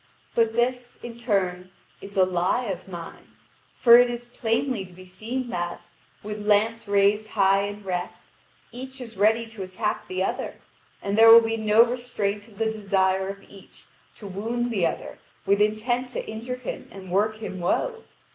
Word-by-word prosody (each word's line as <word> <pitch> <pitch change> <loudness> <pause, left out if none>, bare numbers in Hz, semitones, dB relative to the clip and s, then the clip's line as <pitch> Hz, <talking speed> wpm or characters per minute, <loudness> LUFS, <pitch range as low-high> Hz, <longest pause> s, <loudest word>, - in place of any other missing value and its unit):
But 225 -1 +2
this, 245 +1 -1
in 240 -1 -7
turn, 190 -6 -1 0.3
is 200 0 -10
a 185 - +6
lie 185 +7 0
of 190 -4 -5
mine, 170 -3 -10 0.4
for 235 -1 +8
it 245 0 +4
is 240 0 -5
plainly 235 -1 -1
to 185 - -13
be 185 +1 -13
seen 230 +8 -5
that, 175 -3 -4 0.4
with 210 0 -5
lance 220 +2 +2
raised 205 +2 +2
high 195 -1 +3
in 205 0 -7
rest, 180 -2 -5 0.4
each 260 +2 -9
is 230 -3 -8
ready 220 +4 +3
to 220 -3 -9
attack 190 +3 -3
the 185 0 -1
other, - - -3 0.5
and 200 0 -1
there 225 +1 +8
will 230 +1 +11
be 225 0 -1
no 220 +1 +5
restraint 225 -4 -3
of 210 -3 -18
the 220 0 0
desire 190 -2 +1
of 195 0 -8
each 195 -1 -16 0.3
to 210 - -12
wound 230 +5 -2
the 190 -7 +2
other - - -6 0.3
with 200 +1 +3
intent 240 +4 0
to - - -4
injure 230 +3 -5
him 250 -2 -7
and 190 -2 -10
work 210 +3 +2
him 215 -3 -7
woe. 455 - -1
210 Hz, 175 wpm, -25 LUFS, 195-235 Hz, 0.5 s, will